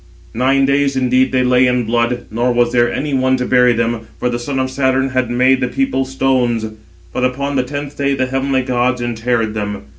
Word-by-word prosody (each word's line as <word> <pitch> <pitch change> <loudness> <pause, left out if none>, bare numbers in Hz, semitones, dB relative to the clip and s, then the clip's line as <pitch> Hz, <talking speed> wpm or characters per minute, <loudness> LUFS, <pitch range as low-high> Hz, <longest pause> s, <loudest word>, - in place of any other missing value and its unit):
Nine 135 +3 +2
days 140 0 +1
indeed 130 0 +2
they 130 -1 +2
lay 125 0 +3
in 125 -1 +1
blood, 120 +2 -1
nor 120 +3 0
was 120 0 +1
there 120 -1 +2
any 145 0 -3
one 130 0 +2
to 125 - -2
bury 125 -1 +4
them, 115 -1 -2
for 125 - 0
the 120 - -2
son 135 +3 -4
of 130 0 -1
Saturn 130 0 +1
had 130 -2 -1
made 130 +2 +2
the 125 - +1
people 270 - -1
stones; 130 -4 0 0.5
but 125 - -2
upon 140 +3 -1
the 130 - +2
tenth 145 +2 -6
day 140 -1 0
the 130 - 0
heavenly 135 0 -1
gods 125 0 0
interred 115 -1 -1
them. 105 -6 -4
125 Hz, 210 wpm, -16 LUFS, 120-135 Hz, 0.5 s, bury